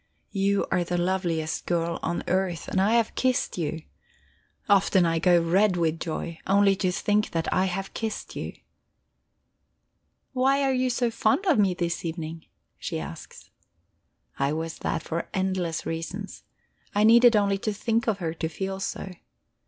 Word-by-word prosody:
You 200 0 +1
are 180 - +2
the 175 +1 -2
loveliest 175 -3 -1
girl 170 -1 0
on 170 +1 -2
earth, 185 -2 -1
and 190 - +1
I 205 +4 +3
have 230 -2 +2
kissed 255 -6 0
you. 160 0 -3 0.8
Often 195 -2 +4
I 165 -1 +1
go 175 +1 +5
red 180 +3 +3
with 165 -1 0
joy, 165 0 -4
only 195 0 +4
to 185 -2 +1
think 210 +3 +1
that 165 -1 -1
I 185 - +3
have 195 +1 -3
kissed 220 -1 -4
you." - - -5 1.8
"Why 270 +2 +3
are 270 -1 +2
you 255 0 +1
so 245 -1 0
fond 225 - +1
of 320 - +3
me 190 -3 +3
this 170 -1 -2
evening?" 165 -1 -5 0.3
she - - -3
asks. - - -9 0.9
I 140 +1 +1
was 160 +1 -4
that - - -2
for 165 +1 -4
endless 185 -3 -1
reasons; 175 +5 -5 0.5
I 205 - +3
needed 235 +1 +7
only 200 -1 +2
to 215 - -1
think 225 +3 -1
of 220 -3 +1
her 165 -4 -3
to 160 -1 -3
feel 190 +3 -4
so. 195 0 -4
190 Hz, 160 wpm, -26 LUFS, 165-210 Hz, 1.8 s, needed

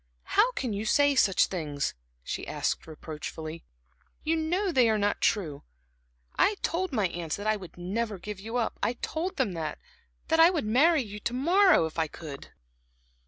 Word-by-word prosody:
"How - - +5
can 250 - -2
you 200 +1 -3
say 285 +6 +4
such 200 -8 +4
things," 150 -6 -3 0.3
she - - -4
asked - - -2
reproachfully. 155 +1 -7 0.6
"You 320 +1 +1
know 355 +5 0
they 250 -7 +4
are 220 - +2
not 205 0 0
true. 160 -10 0 0.8
I 415 - +4
told 370 +2 -1
my 215 -7 +1
aunts 170 -2 -3
that 205 - -7
I 215 0 +3
would 185 -5 -10
never 205 +4 -2
give 205 +2 -7
you 225 +4 -4
up; 235 - -1
I - - +1
told 340 +9 -4
them 200 - +1
that 160 -3 -4 0.5
that 325 - +3
I 330 +1 +9
would 335 -10 -1
marry 280 +7 +4
you 210 -1 -8
to 235 - -3
morrow, 350 - +5
if 160 +1 -5
I 160 - +1
could." 150 -3 -9
215 Hz, 180 wpm, -28 LUFS, -, 0.8 s, I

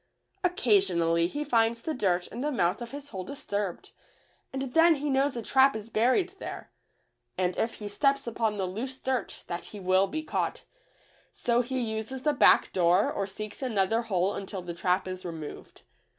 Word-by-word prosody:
Occasionally 190 - +3
he 290 +11 -3
finds 230 -4 +2
the 315 - -2
dirt 180 -8 +1
in 235 - -6
the 300 +2 0
mouth 180 -4 +1
of 235 - -5
his 285 +1 -8
hole 190 -6 -5
disturbed, 205 -6 -4 0.6
and 265 -1 -4
then 330 0 +6
he 290 0 -2
knows 270 0 +2
a 235 - -4
trap 265 +3 +4
is 220 +1 -7
buried 255 - +3
there, - - -7 0.7
and 180 -1 0
if 225 - -1
he 210 - -7
steps 275 +7 +1
upon 225 -2 -1
the 190 - 0
loose 250 +8 -5
dirt 260 -5 -3
that 175 0 -5
he 210 - -9
will 185 +1 +3
be 315 +6 -4
caught, - - -2 0.7
so 240 0 +1
he 260 +2 -3
uses 225 +3 -4
the 300 - +3
back - - +5
door 175 0 +3
or 195 - -2
seeks 215 +4 -7
another 225 -3 +1
hole 195 -3 0
until 195 -1 -5
the 175 -1 -5
trap 180 +2 0
is 185 0 -5
removed. 160 -4 -8
220 Hz, 180 wpm, -28 LUFS, 185-265 Hz, 0.7 s, then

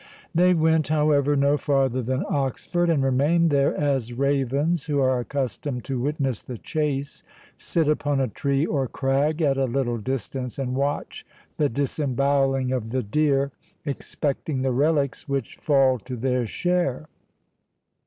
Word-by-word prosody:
They 180 +2 +4
went, 160 -2 +2
however, 150 -1 +2
no 140 +1 +3
farther 135 -3 +1
than 130 +3 -1
Oxford, 145 +5 -1
and 150 -5 +2
remained 150 +6 +3
there, 140 -1 +2
as 135 -5 0
ravens, 140 +4 0
who 145 -3 0
are 130 -2 +2
accustomed 125 0 -3
to 130 -2 -3
witness 135 -4 -1
the 125 - -7
chase, 145 +1 -3 0.3
sit 165 -3 -1
upon 145 -2 +1
a 135 - +1
tree 140 +5 0
or 140 -5 0
crag, 140 +6 0
at 135 -2 +2
a 135 - +2
little 120 -2 -1
distance, 130 +1 -4
and 130 -2 -2
watch 140 +2 -2 0.3
the 145 -2 +2
disembowelling 135 0 0
of 120 -4 -2
the 130 +2 -1
deer, 140 +4 +1 0.3
expecting 140 -1 -3
the 135 - +1
relics 140 +1 0
which 135 -4 -3
fall 135 -4 +3
to 125 +5 -7
their 125 0 0
share. 175 -2 -1
140 Hz, 145 wpm, -24 LUFS, 130-150 Hz, 0.3 s, They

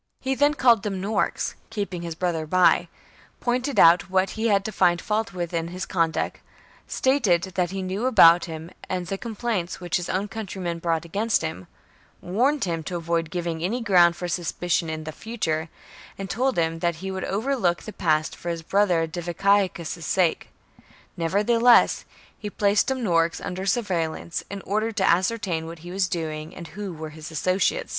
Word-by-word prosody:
He 265 +1 -1
then 290 +2 +3
called 240 -7 +5
Dum 195 -2 -3
norix, 200 +2 -1 0.2
keeping 200 -5 -4
his 170 -1 -5
brother, 165 -2 -2
by; 185 +2 +4 0.5
pointed 250 -1 0
out 170 +2 +6
what 190 0 +1
he 225 +1 -1
had 200 -2 +2
to 220 - -3
find 175 -3 +3
fault 220 +3 -1
with 175 -1 -4
in 165 0 -1
his 180 +2 -5
conduct; 165 -3 -1 0.5
stated 195 -10 +1
what 180 -2 +1
he 190 +1 -4
knew 195 +6 -2
about 170 -8 +7
him, 160 +1 -8 0.2
and 180 -1 -2
the 195 +3 -3
complaints 220 -6 -3
which 175 -2 -1
his 180 - -5
own 195 +3 -1
countrymen 190 -5 -5
brought 165 -1 -1
against 200 +3 0
him; 155 - -5 0.5
warned 255 +10 +1
him 170 -3 -1
to 180 - -4
avoid 165 -1 -1
giving 170 -1 -3
any 220 +8 -1
ground 180 -7 +5
for 180 +1 -4
suspicion 175 -1 -1
in 155 0 -4
the 155 - -5
future; 160 -6 -3 0.5
and 195 -1 -5
told 260 +4 0
him 165 -1 0
that 170 0 0
he 190 +4 -5
would 190 -1 -4
overlook 205 -4 0
the 215 - -8
past 155 -3 0
for 175 - -6
his 165 -1 -3
brother 180 -3 +2
Diviciacus's 175 0 0
sake. 175 0 +1 0.7
Nevertheless 220 +8 +4 0.3
he 210 - -5
placed 205 0 +2
Dumnorix 175 -11 +1
under 185 +1 -5
surveil 185 -7 0
lance, 170 - -5
in 200 0 -6
order 215 +3 -1
to 205 -3 0
ascertain 180 -3 +1
what 165 0 -10
he 175 - -7
was 190 0 +1
doing 155 -3 -4
and 170 -4 -9
who 195 +3 -6
were 155 -2 -7
his 155 0 -9
associates. 185 - 0
185 Hz, 180 wpm, -24 LUFS, 170-210 Hz, 0.7 s, about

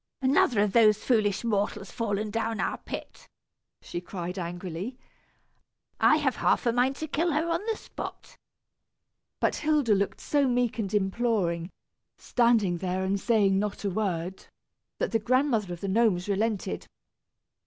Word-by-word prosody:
another 260 -4 +3
of 205 -2 +1
those 215 -3 +6
foolish 215 -3 +1
mortals 205 -3 -1
fallen 210 -2 -2
down 225 0 -2
our - - -1
pit!" - - -8 0.5
she 175 - -5
cried, 180 +1 -5
angrily; 175 +6 -5 1.0
"I - - +6
have - - 0
half - - +2
a 235 - +2
mind 250 +3 +2
to 315 - -5
kill 325 +3 0
her 310 +3 +1
on 335 - 0
the 445 -1 0
spot." - - -8 1.0
But - - +1
Hilda 300 -7 +2
looked 200 0 0
so 285 -2 +1
meek 245 -2 0
and 200 -3 -2
imploring, 190 -4 0 0.5
standing 225 -8 +2
there 185 +1 -1
and 195 +1 0
saying 200 -4 +3
not 205 0 -3
a 200 - 0
word, 185 -2 -2 0.5
that - - -1
the 225 - +2
Grandmother 240 -4 +1
of 175 - -6
the 200 - -3
Gnomes 195 -3 +2
relented. 200 - -1
210 Hz, 150 wpm, -27 LUFS, 190-240 Hz, 1.0 s, those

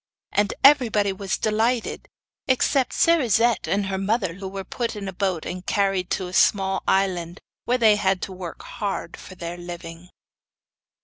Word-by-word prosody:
And 205 0 +1
everybody 225 -8 +5
was 190 0 -3
delighted, 225 +3 0 0.4
except 260 0 +2
Cerisette 240 - +3
and 200 0 0
her 190 0 -2
mother, 195 -2 0
who 190 +2 -7
were 195 0 -6
put 235 +3 -3
in 200 -2 -6
a 190 - -5
boat 185 -3 -1
and 180 0 -5
carried 195 -2 0
to 190 - -1
a 180 - -9
small 190 0 +3
island, 180 -2 0 0.3
where 250 - +2
they 220 -3 +5
had 190 -2 +1
to - - -4
work 180 -2 -8
hard 200 -2 -4
for 185 - -12
their 170 0 -6
living. 175 0 -9
195 Hz, 165 wpm, -23 LUFS, 185-220 Hz, 0.4 s, everybody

